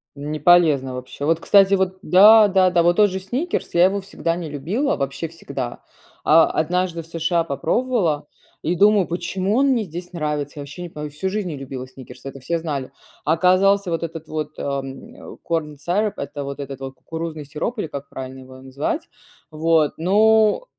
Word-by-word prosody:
Не 150 Hz, +2 st, -5 dB
полезно 150 Hz, -5 st, +4 dB
вообще! 125 Hz, +3 st, -6 dB
Вот, 165 Hz, +1 st, +2 dB
кстати, 195 Hz, +2 st, +5 dB
вот 190 Hz, -1 st, +1 dB
да, 210 Hz, +3 st, +7 dB
да, 190 Hz, -1 st, +4 dB
да, 175 Hz, -1 st, +2 dB
вот 175 Hz, +1 st, +3 dB
тот 210 Hz, -1 st, +5 dB
же 190 Hz, -, -4 dB
"Сникерс", 255 Hz, -, -3 dB
я 175 Hz, +1 st, +6 dB
его 200 Hz, +1 st, +1 dB
всегда 170 Hz, -3 st, -3 dB
не 170 Hz, -2 st, -5 dB
любила, 195 Hz, -, -1 dB
вообще 140 Hz, +3 st, -3 dB
всегда. 140 Hz, -6 st, -6 dB, 0.4 s
А 160 Hz, +1 st, +6 dB
однажды 175 Hz, +1 st, -1 dB
в 165 Hz, -, -15 dB
США 165 Hz, +1 st, 0 dB
попробовала 165 Hz, -, 0 dB, 0.3 s
и 175 Hz, -, -1 dB
думаю: 205 Hz, 0 st, +4 dB
"Почему 185 Hz, +4 st, -2 dB
он 275 Hz, +1 st, +3 dB
мне 235 Hz, -5 st, +1 dB
здесь 175 Hz, +2 st, -8 dB
нравится?" 150 Hz, -2 st, -3 dB
Я -, -, -4 dB
вообще 145 Hz, +5 st, -8 dB
не 175 Hz, -, -7 dB
пойму, 150 Hz, -2 st, -6 dB
всю 155 Hz, +6 st, -3 dB
жизнь 205 Hz, -1 st, -2 dB
не 155 Hz, -, -5 dB
любила 130 Hz, -1 st, -7 dB
сникерс- 130 Hz, -1 st, -13 dB
это 135 Hz, 0 st, -7 dB
все 165 Hz, +6 st, -1 dB
знали. 145 Hz, -5 st, -4 dB, 0.3 s
А 155 Hz, -, +3 dB
оказался 190 Hz, +3 st, +3 dB
вот 165 Hz, 0 st, -2 dB
этот 165 Hz, -1 st, -6 dB
вот, 155 Hz, -1 st, -3 dB
ам, 135 Hz, -1 st, -5 dB
а, -, -, -11 dB, 0.2 s
corn 150 Hz, -3 st, -1 dB
syrup- 205 Hz, +5 st, 0 dB
это 140 Hz, +1 st, -5 dB
вот 140 Hz, +1 st, -6 dB
этот 135 Hz, -1 st, -6 dB
вот 135 Hz, 0 st, -6 dB
кукурузный 160 Hz, +1 st, -6 dB
сироп 155 Hz, -, -4 dB
или 165 Hz, -, -2 dB
как 140 Hz, -1 st, -7 dB
правильно 130 Hz, 0 st, -8 dB
его 130 Hz, 0 st, -13 dB
назвать. 140 Hz, -, -3 dB, 0.4 s
Вот, 155 Hz, -1 st, +2 dB
ну. 215 Hz, -, +3 dB
165 Hz, 190 wpm, -21 LUFS, 145-190 Hz, 0.4 s, да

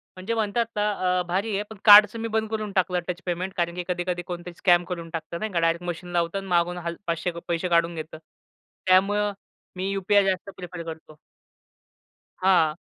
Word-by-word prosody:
म्हणजे 190 Hz, +5 st, -3 dB
म्हणतात 225 Hz, +1 st, -1 dB
अ, 185 Hz, -3 st, +1 dB
भारी 200 Hz, +4 st, -1 dB
आहे, 205 Hz, -, -1 dB
पण 220 Hz, -, -10 dB
कार्डचं 210 Hz, +1 st, +9 dB
मी 230 Hz, -, -2 dB
बंद 220 Hz, 0 st, -1 dB
करून 215 Hz, -2 st, -3 dB
टाकलं 180 Hz, -1 st, +2 dB
टच 180 Hz, +1 st, -4 dB
पेमेंट, 185 Hz, +2 st, -3 dB
कारण 170 Hz, 0 st, -1 dB
की 180 Hz, -, -3 dB
कधी-कधी 175 Hz, 0 st, -2 dB
कोणीतरी 175 Hz, 0 st, -6 dB
स्कॅम 175 Hz, -2 st, +4 dB
करून 170 Hz, -2 st, -6 dB
टाकतं, 165 Hz, +1 st, -5 dB
नाही 215 Hz, -1 st, -3 dB
का? 170 Hz, -, +2 dB
डायरेक्ट 165 Hz, +1 st, +1 dB
मशीन 175 Hz, +1 st, -5 dB
लावतं 170 Hz, +2 st, 0 dB
आणि 195 Hz, -, -5 dB
मागून 175 Hz, 0 st, +1 dB
हल 170 Hz, -1 st, -4 dB
500 170 Hz, +2 st, -1 dB, 0.2 s
पैसे 170 Hz, +1 st, -1 dB
काढून 170 Hz, 0 st, +2 dB
घेतं. 155 Hz, 0 st, -7 dB, 0.7 s
त्यामुळे 205 Hz, +3 st, +3 dB, 0.4 s
मी 185 Hz, +1 st, -2 dB
यु-पी-आय 200 Hz, +1 st, +3 dB
जास्त 190 Hz, +1 st, -1 dB
प्रिफर 180 Hz, -1 st, -7 dB
करतो. 160 Hz, -2 st, -10 dB, 1.2 s
हां. 170 Hz, -5 st, +3 dB
180 Hz, 180 wpm, -25 LUFS, 170-200 Hz, 1.2 s, कार्डचं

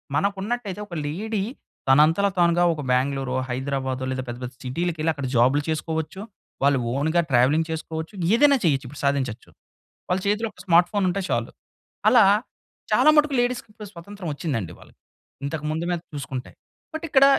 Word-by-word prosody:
మనకున్నట్టైతే, 200 Hz, +5 st, -1 dB
ఒక 180 Hz, -, -11 dB
లేడీ 205 Hz, +7 st, -2 dB, 0.5 s
తనంతల 155 Hz, +8 st, +5 dB
తానుగా 175 Hz, 0 st, +4 dB
ఒక 155 Hz, -, -5 dB
బాంగ్‌ళూరో, 130 Hz, 0 st, 0 dB
హైదరాబాదో, 130 Hz, 0 st, -2 dB
లేదా 130 Hz, 0 st, -2 dB
పెద్ద 120 Hz, -, -5 dB
పెద్ద 125 Hz, -, -5 dB
సిటీలకెళ్లి 160 Hz, +4 st, -1 dB
అక్కడ 140 Hz, -2 st, -5 dB
జాబ్‌లు 130 Hz, +5 st, +4 dB
చేసుకోవచ్చు. 160 Hz, +3 st, -3 dB, 0.4 s
వాళ్ళు 140 Hz, -1 st, +4 dB
ఓన్‌గా 160 Hz, +5 st, +2 dB
ట్రావెలింగ్ 135 Hz, +6 st, +3 dB
చేసుకోవచ్చు. 160 Hz, +2 st, -5 dB, 0.2 s
ఏదైనా 285 Hz, +3 st, +5 dB
చేయొచ్చు. 140 Hz, -4 st, +2 dB
ఇప్పుడు 145 Hz, +3 st, -10 dB
సాధించొచ్చు. 130 Hz, -4 st, -1 dB, 0.6 s
వాళ్ళ 180 Hz, +1 st, +1 dB
చేతిలో 210 Hz, +3 st, +1 dB
ఒక -, -, -21 dB
స్మార్ట్ 175 Hz, -1 st, +5 dB
ఫోన్ 205 Hz, -2 st, 0 dB
ఉంటే 195 Hz, +2 st, -1 dB
చాలు. -, -, -1 dB, 0.6 s
అలా 240 Hz, -4 st, +7 dB, 0.7 s
చాలా -, -, +5 dB
మట్టుకు 300 Hz, -1 st, +4 dB
లేడీస్‌కి 245 Hz, -1 st, -1 dB
ఇప్పుడు 210 Hz, -1 st, -10 dB
స్వతంత్రం 185 Hz, +1 st, -8 dB
వచ్చిందండి 135 Hz, -, -3 dB
వాళ్లు. -, -, -18 dB, 0.5 s
ఇంతకు 150 Hz, +2 st, -4 dB
ముందు 160 Hz, +2 st, -2 dB
మీద 175 Hz, -1 st, -1 dB
చూసుకుంటే. 135 Hz, -3 st, -5 dB, 0.4 s
బట్ 315 Hz, -, -4 dB
ఇక్కడ 275 Hz, -2 st, +6 dB
160 Hz, 150 wpm, -24 LUFS, 135-200 Hz, 0.7 s, అలా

